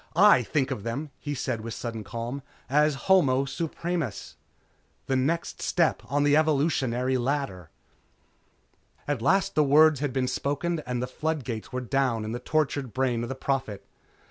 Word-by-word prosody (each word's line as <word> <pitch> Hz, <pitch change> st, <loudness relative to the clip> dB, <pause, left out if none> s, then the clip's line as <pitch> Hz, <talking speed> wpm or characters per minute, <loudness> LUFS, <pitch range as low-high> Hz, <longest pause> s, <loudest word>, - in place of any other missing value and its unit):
I 200 Hz, -6 st, +7 dB
think 135 Hz, +3 st, -1 dB
of -, -, -3 dB
them," 130 Hz, +7 st, -4 dB
he 145 Hz, -1 st, -4 dB
said 115 Hz, -3 st, -2 dB
with 115 Hz, 0 st, -6 dB
sudden 115 Hz, -2 st, -5 dB
calm, 115 Hz, +6 st, -5 dB, 0.3 s
"As 150 Hz, +1 st, +3 dB
Homo 140 Hz, -9 st, +4 dB
Supremus. 160 Hz, -, -3 dB, 0.7 s
The 135 Hz, -, 0 dB
next 155 Hz, +6 st, -1 dB
step -, -, +1 dB
on 145 Hz, +1 st, 0 dB
the 145 Hz, 0 st, +4 dB
evolutionary 135 Hz, -5 st, +1 dB
ladder...." 120 Hz, -, -2 dB, 1.4 s
At 145 Hz, -5 st, -1 dB
last 190 Hz, +9 st, +2 dB
the 155 Hz, -, +4 dB
words 150 Hz, +1 st, +5 dB
had 145 Hz, -1 st, -1 dB
been 130 Hz, 0 st, 0 dB
spoken 145 Hz, +6 st, -1 dB
and 125 Hz, -1 st, -2 dB
the -, -, 0 dB
flood 155 Hz, +2 st, -2 dB
gates 115 Hz, -3 st, -5 dB
were 125 Hz, -, -3 dB
down 125 Hz, -3 st, 0 dB
in 110 Hz, -, -4 dB
the 120 Hz, -, -3 dB
tortured 140 Hz, -2 st, -1 dB
brain 130 Hz, -3 st, +1 dB
of 120 Hz, -, -4 dB
the 135 Hz, -, -3 dB
Prophet. 130 Hz, -7 st, -2 dB
135 Hz, 165 wpm, -27 LUFS, 120-150 Hz, 1.4 s, I